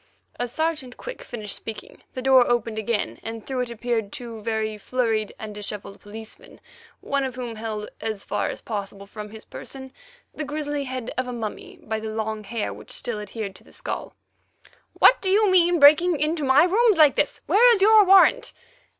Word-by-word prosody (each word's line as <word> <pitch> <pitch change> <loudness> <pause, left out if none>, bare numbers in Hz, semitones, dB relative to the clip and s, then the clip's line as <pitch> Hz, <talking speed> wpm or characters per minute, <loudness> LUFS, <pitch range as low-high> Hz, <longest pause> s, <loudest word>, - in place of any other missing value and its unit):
As 245 -1 -2
Sergeant 310 -5 -2
Quick - - -8
finished 215 -4 -6
speaking, 225 -1 -9
the 255 - -4
door 260 -2 +5
opened 230 -2 0
again, 210 - -2
and 225 -1 -7
through 265 -2 -3
it 250 -1 -1
appeared 230 -2 -2
two 230 -3 -7
very 220 -1 -2
flurried 220 -1 -1
and 215 -1 -7
dishevelled 205 -1 -7
policemen, 220 +1 -12 0.4
one 280 0 -1
of 260 -2 -4
whom 245 -2 -5
held, 215 -1 -5
as 215 -3 -4
far - - -1
as - - -7
possible 200 -2 -6
from 210 +1 -9
his 220 +1 -12
person, 265 -1 -9 0.4
the 310 - -5
grizzly 290 -1 -3
head 255 -2 -5
of 255 - -2
a - - -4
mummy 250 - -6
by 220 -6 -3
the 220 0 -5
long 220 0 -3
hair 225 0 -3
which - - -13
still 230 -3 -3
adhered 210 -1 -6
to - - -20
the - - -20
skull. - - -6 0.8
"What - - +5
do 380 - -1
you 410 +1 +4
mean 350 -1 +5
by 330 - -1
breaking 310 +2 +6
into 310 0 0
my 270 +3 +5
rooms 420 +3 +3
like 300 -3 +6
this? - - -1
Where's 460 -2 +5
your 435 0 +7
warrant?" 390 +6 +5
245 Hz, 190 wpm, -24 LUFS, 220-305 Hz, 0.8 s, your